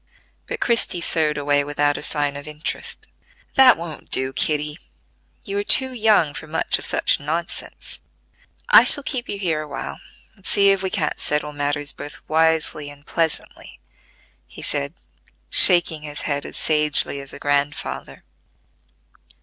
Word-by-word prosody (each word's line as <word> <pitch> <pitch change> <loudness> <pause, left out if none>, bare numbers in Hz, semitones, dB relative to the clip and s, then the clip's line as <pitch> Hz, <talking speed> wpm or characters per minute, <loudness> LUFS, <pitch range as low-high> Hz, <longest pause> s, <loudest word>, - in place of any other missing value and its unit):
But - - -4
Christie 230 -6 0
sewed 155 -3 0
away 145 0 +1
without 145 0 0
a - - -4
sign 145 -2 -2
of 145 +1 -9
interest. 150 +1 -6 0.5
"That 265 -2 +6
won't 165 -2 -9
do, 130 0 +3
Kitty: 150 +2 -1 0.7
you 200 -2 -3
are - - -2
too 260 +5 +4
young 215 -10 +2
for 155 - -8
much 155 - 0
of - - -1
such - - +1
nonsense. 160 +4 -5 0.7
I - - +8
shall 285 - +7
keep 255 -3 -4
you 200 - -3
here 165 -6 -1
a 155 - -8
while, 140 - -7 0.4
and 195 - -25
see 200 0 +4
if 195 -1 0
we 190 - -1
can't 160 -6 -2
settle 150 0 -2
matters 145 0 -2
both 145 - -11
wisely 160 -2 0
and 145 0 -15
pleasantly," 165 -2 -4 0.7
he - - -12
said, 70 - -3 0.6
shaking 170 -3 +6
his 150 -1 -6
head 140 -1 -3
as - - -8
sagely 150 -2 -1
as 140 0 -9
a - - -8
grandfather. 145 +1 -3
150 Hz, 155 wpm, -21 LUFS, 145-175 Hz, 0.7 s, I